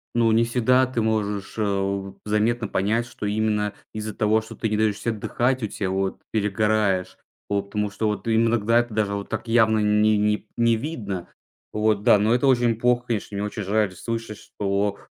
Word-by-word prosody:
Ну, 115 -1 +3
не 115 +1 +4
всегда 125 +2 +3
ты 125 -3 -2
можешь, 105 -3 -1
э, - - -1
у 100 -1 -2
заметно 110 +2 +1
понять, 110 +6 0
что 120 - -7
именно 105 0 0 0.2
из-за 110 0 -5
того, 110 +1 +2
что 110 - -11
ты 110 - -2
не 105 - 0
даешь 110 -2 +1
се 115 - -2
отдыхать, 120 +4 -1
у 110 - 0
тебя 100 -2 -3
вот 95 0 -2
перегораешь, 105 -2 0 0.3
по 100 -1 0
потому 105 +1 -3
что 110 +2 -1
вот 105 -2 -2
ты 115 - 0
им 115 +1 +3
иногда 115 +1 +3
это 120 -2 -2
даже 105 -2 0
вот 100 0 -5
так - - -4
явно 110 -1 +4
не 105 0 +3
не 105 0 0
не 115 -1 +3
видно. 110 - -5 0.5
Вот 105 -1 +1
да. 105 - +6
Но 110 +3 +3
это 125 +3 +2
очень 120 -3 +3
плохо, 120 +1 +1
конечно. 105 -3 -3
Мне 105 - -1
очень 105 0 -4
жаль 105 +1 +1
слышать, 115 +2 -5
что, 100 0 -2
110 Hz, 205 wpm, -24 LUFS, 100-115 Hz, 0.5 s, да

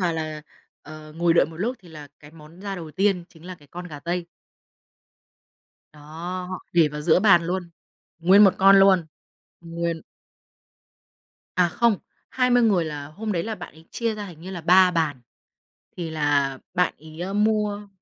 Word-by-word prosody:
vào 175 -2 +1
là, 155 -1 -5 0.4
ờ, 155 0 -11
ngồi 170 0 +2
đợi - - +4
một 160 - -11
lúc 240 +8 -2
thì 180 - -18
là 150 -2 -11
cái 150 0 -14
món 160 +2 -16
ra 200 -1 -5
đầu 165 -3 -8
tiên 190 +2 +1
chính 165 0 -19
là 185 - -7
cái 145 -4 -21
con 180 +3 -8
gà 150 -2 -9
tây. 175 +2 -3 1.7
Đó, 150 - -17 0.5
họ 185 - -4
để 165 -3 +4
vào 150 +1 -7
giữa 160 +4 +3
bàn 190 -5 +5
luôn. 180 -1 -3 0.5
Nguyên 190 +5 +6
một 195 - +5
con 195 +1 +7
luôn. 190 -4 +5 0.5
Nguyên. 170 -1 -4 1.5
À, 180 -1 +4
không, 225 +5 +2 0.3
20 250 -1 +3
người 195 -7 +3
là 145 -2 -6
hôm 210 +8 -5
đấy 170 -3 -1
là 225 - -4
bạn - - -10
ấy 160 +1 -17
chia 230 -2 -2
ra 210 -1 -6
hình 170 -4 -12
như 185 +3 -8
là 180 -3 -6
3 180 +2 +5
bàn. 160 -6 -1 0.8
Thì 170 -2 -4
là 145 -3 0 0.2
bạn 180 0 +1
ấy 160 +5 -7
mua 210 -1 0
175 Hz, 180 wpm, -24 LUFS, 155-195 Hz, 1.7 s, con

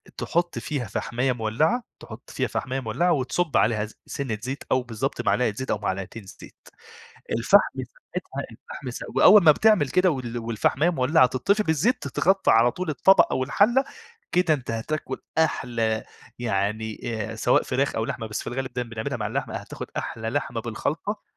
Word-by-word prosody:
أ - - -15
تحُط 175 0 -1
فيها 140 -7 -3
فَحْماية 125 +5 -1
مولّعة، 125 - 0 0.2
تحُط - - -11
فيها - - -1
فَحْماية 130 0 -3
مولّعة 135 +9 0
وتصُب 140 +5 0
عليها 110 -1 +2
ز 110 - -14
سِنّة 130 -6 -3
زيت 130 +4 -5
أو 130 - +3
بالضبط 125 +3 -3
معلقة 125 -4 +2
زيت 130 +5 -4
أو - - +1
معلقتين 100 +2 -4
الزيت. 95 - -15 0.7
الفحم 155 - +4
ساعتها - - -7
الفحم - - -9
س - - -7 0.2
وأول 210 -4 +8
ما 155 - +9
بتعمل 210 -5 +3
كده 180 +5 +3
وال 125 -5 -3
والفَحْماية 115 +8 +1
مولّعة 135 -2 +4
تطِّفي 200 - +1
بالزيت، 210 - +1
تتغطّى 190 +2 +2
على 115 +2 +5
طول 180 +4 -4
الطبق 190 +7 +5
أو 130 - 0
الحَلّة، 235 - +3 0.5
كده 180 -3 +3
أنت 130 -5 -5
هتاكُل 130 +4 -3 0.2
أحلى 115 -8 0 0.3
يعني 110 -1 -2
آآ 110 -1 -3
سواء - - +3
فراخ 135 +2 -1
أو 110 - 0
لحمة، 115 - -4
بس 105 - -4
في - - -16
الغالب 130 +1 -4
دايمًا 120 -1 -4
بنعملها 115 +4 -3
مع 105 -3 -3
اللحمة 105 - -3
أ - - -2
هتاخُد - - -8
أحلى 110 0 -3
لحمة 125 -3 -2
بالخلطة 145 - -3
130 Hz, 175 wpm, -25 LUFS, 115-160 Hz, 0.7 s, ما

